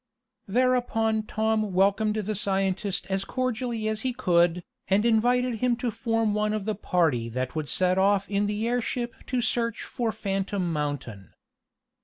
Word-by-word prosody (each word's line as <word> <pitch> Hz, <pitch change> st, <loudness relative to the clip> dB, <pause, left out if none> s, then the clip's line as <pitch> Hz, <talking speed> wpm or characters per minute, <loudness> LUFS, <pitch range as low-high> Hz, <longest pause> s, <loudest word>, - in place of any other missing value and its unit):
Thereupon 225 Hz, -2 st, +1 dB
Tom 220 Hz, -2 st, 0 dB
welcomed 200 Hz, +3 st, +3 dB
the 215 Hz, 0 st, -2 dB
scientist 195 Hz, -1 st, -1 dB
as 190 Hz, 0 st, 0 dB
cordially 240 Hz, -2 st, -2 dB
as 220 Hz, 0 st, -2 dB
he 255 Hz, 0 st, -1 dB
could, 175 Hz, -6 st, +2 dB, 0.2 s
and 200 Hz, +3 st, +2 dB
invited 240 Hz, +1 st, +2 dB
him 250 Hz, 0 st, +2 dB
to 240 Hz, 0 st, -2 dB
form 225 Hz, -2 st, 0 dB
one 210 Hz, 0 st, 0 dB
of 215 Hz, -2 st, -2 dB
the 215 Hz, -, 0 dB
party 160 Hz, -, 0 dB
that 130 Hz, +4 st, -3 dB
would 155 Hz, -2 st, -3 dB
set 185 Hz, 0 st, +2 dB
off 200 Hz, 0 st, +3 dB
in 205 Hz, 0 st, 0 dB
the 210 Hz, +2 st, -1 dB
airship 240 Hz, 0 st, -1 dB
to 250 Hz, -1 st, 0 dB
search 230 Hz, -1 st, 0 dB
for 235 Hz, -3 st, -2 dB
Phantom 195 Hz, -4 st, -2 dB
Mountain. 140 Hz, -, -4 dB
210 Hz, 155 wpm, -26 LUFS, 190-230 Hz, 0.2 s, welcomed